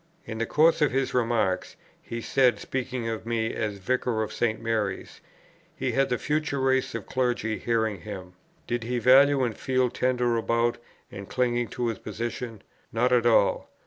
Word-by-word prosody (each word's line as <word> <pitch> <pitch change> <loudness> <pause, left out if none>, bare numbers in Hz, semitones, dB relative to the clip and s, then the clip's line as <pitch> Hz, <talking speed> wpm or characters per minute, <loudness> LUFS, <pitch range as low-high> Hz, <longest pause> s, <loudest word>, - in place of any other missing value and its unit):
In 110 -1 -6
the 115 - -1
course 160 +2 +4
of 150 - +4
his 135 +1 0
remarks, 115 -6 0 0.3
he 115 0 -6
said, 130 0 +3
speaking 130 -2 -4
of 115 -1 -3
me 115 -1 -1
as 105 -2 -2
Vicar 120 +2 0
of 110 - -6
St. 115 -2 0
Mary's: 110 -4 -3 0.5
"He - - -1
had 135 0 +1
the 125 - +1
future 150 0 -1
race 130 0 +1
of - - -5
clergy 120 -4 -1
hearing 110 -5 0
him. 95 -4 -8 0.3
Did 120 0 -2
he 125 +2 -2
value 135 +3 +5
and 115 -3 -1
feel 130 -2 0
tender 125 -2 +1
about, 115 +1 +1 0.3
and 100 0 -8
cling 120 -2 0
to 120 +3 -3
his 110 - -4
position?... 115 -2 -5 0.3
Not 120 +3 +1
at 120 -1 +4
all.... 115 - +3
120 Hz, 175 wpm, -26 LUFS, 110-130 Hz, 0.5 s, value